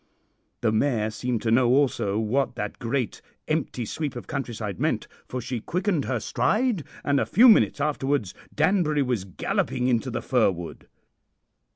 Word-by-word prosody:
The 115 - +2
mare 110 -2 +1
seemed 120 0 -2
to 110 - +1
know 120 +1 +4
also 125 -7 +2
what 115 +6 0
that 105 0 -5
great 120 0 -2 0.3
empty 150 -6 -1
sweep 145 +3 -4
of 120 - -7
countryside 110 -7 -4
meant, - - 0 0.2
for 130 - -4
she 125 0 -4
quickened 180 - -1
her 130 -3 -1
stride, 210 - 0 0.2
and 140 -1 +2
a - - +1
few 245 +5 +6
minutes 220 -9 +5
afterwards 140 -7 0 0.2
Danbury 155 -3 +2
was 120 -7 -1
galloping 125 +6 -1
into 125 +1 +1
the 120 - -4
fir 125 -6 +3
wood. 85 -3 -7
125 Hz, 160 wpm, -25 LUFS, 110-145 Hz, 0.3 s, few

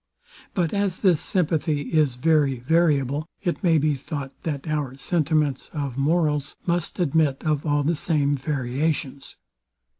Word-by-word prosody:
But 175 -5 0
as 200 -3 0
this 175 -5 +4
sympathy 155 -5 0
is 150 -6 +3
very 145 -1 +2
variable, 145 +1 +1 0.2
it 175 -3 -1
may 165 -3 +4
be 150 0 +2
thought 140 0 -6
that 150 -2 -4
our 145 -4 -2
sentiments 150 -2 0
of 140 -5 -3
morals 150 0 +1
must 170 -1 -1
admit 155 -4 +1
of 155 -1 0
all 145 0 +2
the 165 +4 +1
same 145 -2 +1
variations. 140 0 -2
150 Hz, 140 wpm, -24 LUFS, 140-165 Hz, 0.2 s, this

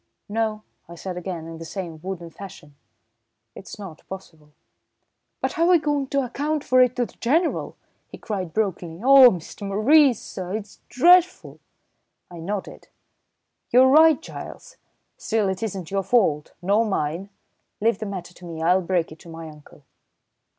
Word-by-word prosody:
"No," 215 0 -2 0.3
I 170 - -9
said 180 +2 -6
again, 180 -2 -5
in 165 0 -9
the - - -7
same 165 -2 -7
wooden 175 -2 -6
fashion. 165 -6 -12 0.8
"It's - - -10
not 190 -6 -10
possible." 160 -6 -11 0.9
"But - - 0
how're 335 +1 +2
we 360 -1 +6
going 290 -3 -1
to 275 0 0
account 295 +4 -2
for 255 -2 +4
it 250 -1 +3
to 245 -1 0
the - - -15
General?" 320 +8 0 0.3
he - - -11
cried 190 -6 -5
brokenly. 180 -5 -2
"Oh, 270 -1 +9
Mr. 175 -3 -7
Maurice, 250 +5 +4
sir, 185 +1 -6
it's 210 -2 -8
dreadful!" 355 +7 +3 0.7
I 175 - -9
nodded. 195 +4 -6 0.8
"You're 255 +2 +6
right, 315 +1 +6
Giles! - - -10 0.4
Still, 220 -3 0
it 190 -1 -3
isn't 190 -6 -5
your 195 0 0
fault, 185 -9 +1
nor 205 +5 +3
mine. 190 -2 -2 0.5
Leave 220 -1 +1
the 215 - -4
matter 180 -3 -7
to 180 - -14
me. 165 -2 -7
I'll 180 +3 +3
break 175 -2 -1
it 155 - -12
to 170 - -14
my 165 0 -8
uncle." 150 -2 -15
195 Hz, 160 wpm, -23 LUFS, 170-250 Hz, 0.9 s, Oh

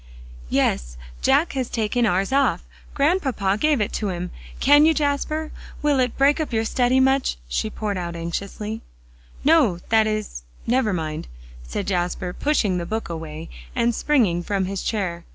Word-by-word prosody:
"Yes; - - 0 0.2
Jack 320 - +3
has 260 -3 -2
taken 230 +1 +1
ours 195 +3 +1
off; 275 0 +2 0.3
Grandpapa 270 - +1
gave 300 -1 +3
it 210 - -1
to 210 - -1
him. 180 -1 -4 0.3
Can 290 +2 +6
you, 320 - +3
Jasper? 305 +2 -1 0.3
Will 290 -2 +3
it 250 -2 0
break 280 +3 +4
up 310 - -2
your 225 -1 0
study 250 +3 +2
much?" 265 - +2
she 140 - -1
poured 210 -3 -3
out 170 -1 -4
anxiously. 200 +6 -4 0.6
"No 290 - +4
that 220 -1 +4
is 215 - -3 0.2
never 245 -2 +2
mind," 155 - -3 0.3
said - - -4
Jasper, 180 -1 -1
pushing 210 -11 +1
the 170 - -5
book 220 -3 -3
away 160 -1 -6 0.3
and 235 -1 +2
springing 225 - +2
from 195 +1 -1
his 195 0 -3
chair. 180 -6 -2
215 Hz, 160 wpm, -23 LUFS, 180-270 Hz, 0.6 s, Can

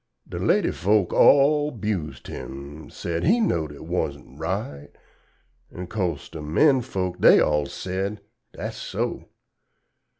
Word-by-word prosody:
Da - - -6
lady - - +2
folks 100 -1 +1
all 145 +1 +5
'bused 105 - -4
him, 70 +3 -8
sed, 85 -1 -4
he 220 +9 +4
knowed 80 - 0
it 75 - -11
wus'n 65 - -3
right 80 -5 -4 0.8
An' 90 - -7
'cose 90 -6 -3
da 80 - -8
men 130 - +3
folks 95 -7 -3
dey - - +7
all 75 -1 +2
sed, 95 +3 -4 0.3
"Dat's - - -6
so." - - -3
90 Hz, 130 wpm, -24 LUFS, 75-110 Hz, 0.8 s, dey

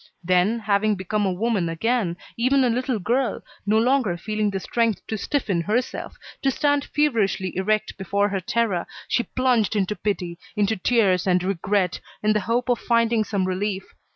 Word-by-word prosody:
Then, 185 +5 +3
having 210 -1 +1
become 200 +2 -1
a - - +1
woman 195 -2 0
again, 190 0 0 0.2
even 260 +3 +3
a 245 - +3
little 250 0 0
girl, 235 +4 0 0.2
no 215 +1 +4
longer 235 -6 +2
feeling 215 +3 -1
the 195 -1 -2
strength 230 +1 0
to 220 - -3
stiffen 210 - -1
herself, 220 +8 -2 0.2
to 275 - +2
stand 285 +1 +1
feverishly 225 -10 0
erect 215 +3 0
before 200 +2 +1
her 195 -1 -2
terror, 200 -2 0 0.2
she - - +2
plunged 245 -4 +1
into 205 0 0
pity, 180 -3 -3 0.2
into 210 +1 +1
tears 190 -3 +2
and 180 -1 +3
regret, 190 0 0 0.2
in 215 0 +3
the 210 - +2
hope 230 +5 -1
of 245 -2 +1
finding 230 -1 +2
some 200 -3 -1
relief. 190 +1 -3
210 Hz, 170 wpm, -23 LUFS, 190-235 Hz, 0.2 s, no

